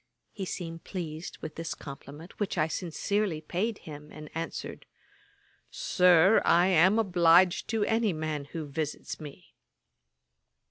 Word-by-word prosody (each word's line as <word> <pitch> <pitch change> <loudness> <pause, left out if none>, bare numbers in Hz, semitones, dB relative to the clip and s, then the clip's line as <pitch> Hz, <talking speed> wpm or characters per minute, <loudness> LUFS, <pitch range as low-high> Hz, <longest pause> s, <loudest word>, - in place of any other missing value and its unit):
He 195 - -5
seemed 165 -2 -6
pleased 165 -3 -6
with 155 - -5
this 165 0 -4
compliment, 145 +4 -11
which 205 -3 -2
I 155 -1 +3
sincerely 180 +2 -1
paid 190 +8 -2
him, 150 -1 -10
and 155 -1 -10
answered, 165 +1 -5 0.8
'Sir, 180 - +4
I 175 +1 +5
am 185 +4 +5
obliged 180 -3 +4
to 220 -2 0
any 225 -2 +2
man 155 -3 -3
who 155 +2 -6
visits 150 +1 -4
me.' 150 -2 -11
165 Hz, 130 wpm, -29 LUFS, 155-190 Hz, 0.8 s, I